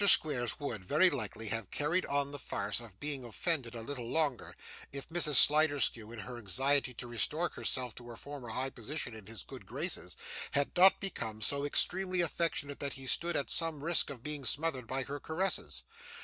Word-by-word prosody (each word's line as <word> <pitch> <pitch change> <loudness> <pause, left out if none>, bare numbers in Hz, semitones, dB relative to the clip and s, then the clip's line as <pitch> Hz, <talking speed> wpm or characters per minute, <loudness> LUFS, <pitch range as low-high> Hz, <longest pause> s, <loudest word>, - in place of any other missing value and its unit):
Squeers 130 - +5
would, 120 -9 -5
very 155 - +5
likely, 115 -4 -3
have 115 -3 -2
carried 155 +5 0
on 140 0 0
the 145 - -5
farce 100 -3 -2
of 110 -5 -12
being 145 -3 -2
offended 125 0 -1
a 115 - -6
little 120 -2 -6
longer, 150 -5 0 0.4
if 140 0 -7
Mrs. 165 -3 +1
Sliderskew, 145 -7 +6
in 120 - -8
her 120 +3 -8
anxiety 135 +6 +2
to - - -5
restore 150 +8 0
herself 125 -3 -3
to 120 - -10
her 120 - -9
former 140 -3 -8
high 130 +4 -2
position 120 +1 -5
in 110 -3 -11
his 110 -4 -7
good - - -11
graces, - - -3 0.4
had 140 0 0
not 190 +2 +6
become 115 - -4
so 140 +6 +1
extremely 185 +4 +3
affectionate 160 -4 0
that 140 -1 -2
he 135 -1 -8
stood 170 +6 +2
at 140 - -1
some 160 -4 +1
risk 170 -1 +1
of 130 -4 -8
being 150 -1 -1
smothered 140 -4 0
by 130 +1 -2
her 145 +2 -6
caresses. 160 - -2
140 Hz, 190 wpm, -32 LUFS, 120-155 Hz, 0.4 s, Sliderskew